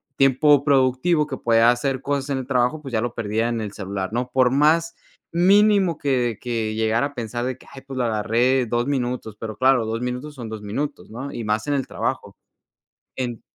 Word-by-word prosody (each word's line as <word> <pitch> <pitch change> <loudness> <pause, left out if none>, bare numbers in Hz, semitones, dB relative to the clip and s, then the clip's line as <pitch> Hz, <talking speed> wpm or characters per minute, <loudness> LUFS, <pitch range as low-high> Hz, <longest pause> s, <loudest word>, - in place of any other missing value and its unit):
tiempo 135 +1 +4
productivo 140 +3 +2
que 135 -3 -5
puede 115 -1 +2
hacer 125 +3 +2
cosas 140 0 -2
en 135 - 0
el 130 - -6
trabajo, 130 +3 +1
pues, 135 -3 -8
ya 110 - +1
lo 120 0 -3
perdía 115 0 -1
en 115 -1 -2
el 105 -2 -5
celular, 95 -2 -4
¿no?, 125 +1 -2
por 130 -1 +4
más 155 +5 +2 0.4
mínimo 195 0 +4
que 125 -7 0
que 115 -3 -2
llegara 110 +3 +1
a 145 - -15
pensar 120 +1 -3
de 130 0 -3
que, - - -19
ay, 135 - -10
pues, 135 -1 -6
lo 125 - +1
agarré 120 +4 +1
2 120 +2 -1
minutos, 125 -6 -2
pero 110 -1 -5
claro, 130 -3 +3
2 115 +1 -3
minutos 125 +4 -4
son 120 -4 -7
2 110 -1 -6
minutos, 110 +9 -4
¿no?, 130 +5 -6
y 120 - -5
más 110 0 0
en 145 - +1
el 135 -2 -2
trabajo, - - -4 0.8
en 120 -3 -4
125 Hz, 210 wpm, -22 LUFS, 115-140 Hz, 0.8 s, tiempo